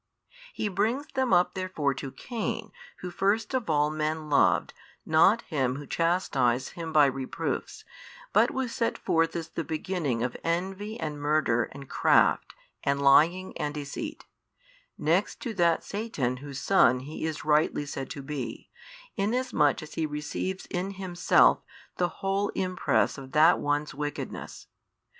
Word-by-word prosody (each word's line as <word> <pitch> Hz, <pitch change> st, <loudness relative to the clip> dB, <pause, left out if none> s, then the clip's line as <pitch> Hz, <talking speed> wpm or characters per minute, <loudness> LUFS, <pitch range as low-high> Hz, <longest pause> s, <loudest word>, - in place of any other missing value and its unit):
He 220 Hz, -, -2 dB
brings 220 Hz, +9 st, 0 dB
them 260 Hz, -2 st, 0 dB
up 175 Hz, -, +4 dB
therefore 185 Hz, -7 st, -1 dB
to 135 Hz, +1 st, -6 dB
Cain 230 Hz, -, -4 dB, 0.3 s
who 180 Hz, -, -5 dB
first 205 Hz, +6 st, 0 dB
of 255 Hz, -8 st, -1 dB
all 150 Hz, -1 st, +2 dB
men 155 Hz, 0 st, -2 dB
loved 140 Hz, -, +3 dB, 0.3 s
not 190 Hz, +9 st, +4 dB
Him 130 Hz, -6 st, -1 dB
who 145 Hz, +1 st, -7 dB
chastised 135 Hz, -8 st, +1 dB
him 165 Hz, -2 st, -6 dB
by 150 Hz, -2 st, +6 dB
reproofs, 135 Hz, -1 st, -3 dB, 0.5 s
but -, -, +5 dB
was 265 Hz, -3 st, -3 dB
set 230 Hz, -, -1 dB
forth 165 Hz, 0 st, +1 dB
as 165 Hz, -1 st, -4 dB
the 165 Hz, -, -4 dB
beginning 160 Hz, -7 st, -2 dB
of 125 Hz, -, -2 dB
envy 190 Hz, +6 st, -2 dB
and 150 Hz, -2 st, -4 dB
murder 145 Hz, -6 st, +2 dB
and 135 Hz, 0 st, -10 dB
craft -, -, +3 dB, 0.3 s
and 140 Hz, 0 st, +1 dB
lying 165 Hz, +7 st, +4 dB
and 150 Hz, 0 st, -2 dB
deceit, 145 Hz, -1 st, -6 dB, 0.7 s
next -, -, +1 dB
to 240 Hz, -5 st, -4 dB
that 170 Hz, -4 st, +2 dB
Satan 200 Hz, -, -2 dB
whose 140 Hz, 0 st, -7 dB
son 125 Hz, -10 st, +4 dB
he 145 Hz, +4 st, -7 dB
is 155 Hz, -2 st, -5 dB
rightly 150 Hz, -1 st, +2 dB
said 135 Hz, -2 st, -5 dB
to 140 Hz, -, -7 dB
be, 135 Hz, -5 st, -6 dB, 0.4 s
inasmuch 210 Hz, -, +1 dB
as 155 Hz, -, -11 dB
he 160 Hz, -, -1 dB
receives 150 Hz, +5 st, -4 dB
in 190 Hz, +2 st, -2 dB
himself 185 Hz, -2 st, +3 dB, 0.4 s
the 175 Hz, -1 st, +1 dB
whole 195 Hz, +1 st, +1 dB
impress 185 Hz, -5 st, 0 dB
of 135 Hz, -1 st, -11 dB
that 155 Hz, +3 st, +6 dB
one's 145 Hz, +1 st, -1 dB
wickedness. 145 Hz, +1 st, -6 dB
160 Hz, 150 wpm, -28 LUFS, 145-190 Hz, 0.7 s, by